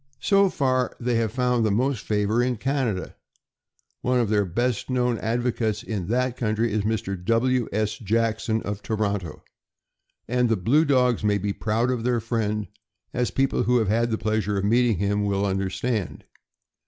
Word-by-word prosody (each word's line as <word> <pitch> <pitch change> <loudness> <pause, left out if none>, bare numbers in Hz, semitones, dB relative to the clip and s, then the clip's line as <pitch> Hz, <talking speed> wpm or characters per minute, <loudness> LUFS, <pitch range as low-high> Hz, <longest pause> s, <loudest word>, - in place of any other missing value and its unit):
So 200 -1 +4
far 130 -5 0
they 125 0 -1
have 115 -2 0
found 125 -1 +1
the 110 - +2
most 120 +3 0
favor 105 +2 +1
in 125 -1 0
Canada. 130 -7 -2 0.9
One 125 0 +1
of 115 -4 +1
their 105 -1 +3
best 120 +7 -1
known 125 -2 +1
advocates 115 -1 -1
in 105 -7 -4
that 125 +2 0
country 110 -1 0
is 110 - +1
Mr. 100 -3 -2
W. 120 +3 +1
S. 110 0 -1
Jackson, 110 +1 0
of 105 0 -4
Toronto; 100 -7 -3 0.8
and 125 0 +1
the 115 - +2
blue 135 - +3
dogs 125 -5 +2
may 105 -1 +2
be 100 0 -2
proud 115 +5 0
of 120 -3 -2
their 120 -1 +1
friend, 110 -2 -1 0.5
as 125 0 0
people 135 0 +1
who 125 +4 +3
have 110 -4 +1
had 115 +2 +2
the 110 - 0
pleasure 110 -2 -1
of 95 - -1
meeting 115 0 +3
him 100 +2 0
will 100 0 0
understand. 95 +2 -2
115 Hz, 170 wpm, -24 LUFS, 105-125 Hz, 0.9 s, So